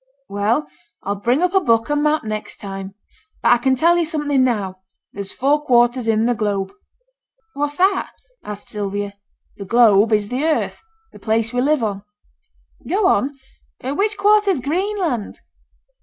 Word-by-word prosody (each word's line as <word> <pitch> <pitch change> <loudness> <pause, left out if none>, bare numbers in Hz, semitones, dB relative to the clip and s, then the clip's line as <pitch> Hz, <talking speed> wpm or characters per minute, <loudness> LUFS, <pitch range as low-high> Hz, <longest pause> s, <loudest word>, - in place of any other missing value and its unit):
'Well, 200 -5 0 0.4
I'll 200 - -1
bring 245 - +1
up 360 0 +1
a 385 - +5
book 230 -5 +1
and 295 - +2
a - - 0
map 305 0 +2
next 215 -1 -5
time. 195 -1 -7 0.5
But - - +4
I - - +6
can 260 +2 +2
tell 340 +6 +3
you 340 - +1
something 295 -4 0
now. 200 -7 -1 0.3
There's 200 -1 -6
four 290 +3 +1
quarters 240 -2 +3
in 220 0 +2
the 245 - +2
globe.' 205 -4 -2 0.8
'What's 290 +1 -2
that?' 380 +1 +2 0.3
asked 205 -1 -8
Sylvia. 205 -1 -4 0.4
'The 200 - -7
globe 220 -1 +5
is 210 -1 +1
the 255 +4 -2
earth; 320 -1 0 0.3
the - - -14
place 225 +1 0
we 245 - +1
live 290 -1 +2
on.' 200 -2 -2 0.9
'Go 395 +2 +1
on. 285 -6 +2 0.5
Which 395 - 0
quarter 415 +1 +4
is 365 -8 +1
Greenland?' 330 - -2
245 Hz, 165 wpm, -20 LUFS, 210-305 Hz, 0.9 s, I